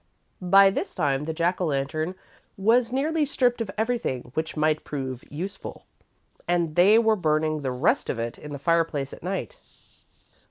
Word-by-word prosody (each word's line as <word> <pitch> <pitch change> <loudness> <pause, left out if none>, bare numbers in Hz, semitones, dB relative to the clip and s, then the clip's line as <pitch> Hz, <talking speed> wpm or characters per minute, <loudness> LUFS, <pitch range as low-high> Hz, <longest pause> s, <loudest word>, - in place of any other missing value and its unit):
By 195 +2 +6
this - - -4
time 140 0 0
the 160 - -2
Jack 175 +3 0
o' - - +2
Lantern 155 +5 -2 0.4
was 230 +4 +3
nearly 305 +4 +1
stripped 250 -4 +1
of 220 - -3
everything 220 - -2
which 160 +1 -3
might 155 0 +1
prove 130 -3 -5
useful, 185 +7 -7 0.6
and 170 -3 0
they 200 +5 +6
were 225 -1 +4
burning 155 -3 0
the 130 -2 -2
rest 125 +1 +1
of - - -1
it 115 0 -4
in 150 - -9
the 145 - -4
fireplace 155 -2 0
at - - -11
night. 195 - -4
165 Hz, 165 wpm, -25 LUFS, 145-210 Hz, 0.6 s, By